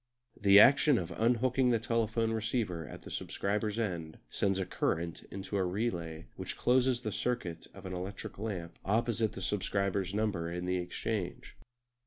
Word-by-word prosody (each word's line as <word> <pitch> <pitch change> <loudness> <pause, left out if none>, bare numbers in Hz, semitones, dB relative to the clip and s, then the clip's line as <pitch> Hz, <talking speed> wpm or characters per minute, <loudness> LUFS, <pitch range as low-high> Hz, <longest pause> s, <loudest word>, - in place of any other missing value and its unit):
The 100 0 +8
action 140 +3 +7
of 85 -5 -3
unhooking 125 +3 +2
the 120 - +4
telephone 115 -1 0
receiver 110 - -1
at - - -10
the - - -10
subscriber's 105 +1 -2
end 85 -8 -2
sends 95 -1 +1
a 95 - -1
current 85 -1 -1
into 100 +1 -4
a 95 - +2
relay 90 -5 -2
which - - -5
closes 125 0 +3
the 110 -3 -3
circuit 110 -8 -2
of - - -11
an 95 - -4
electric 95 +3 -6
lamp 90 -6 -4
opposite 110 +1 +1
the 95 - -6
subscriber's 100 -1 0
number 100 -6 0
in 90 +1 -3
the 90 0 +1
exchange. 90 +1 -3
100 Hz, 160 wpm, -32 LUFS, 90-115 Hz, -, The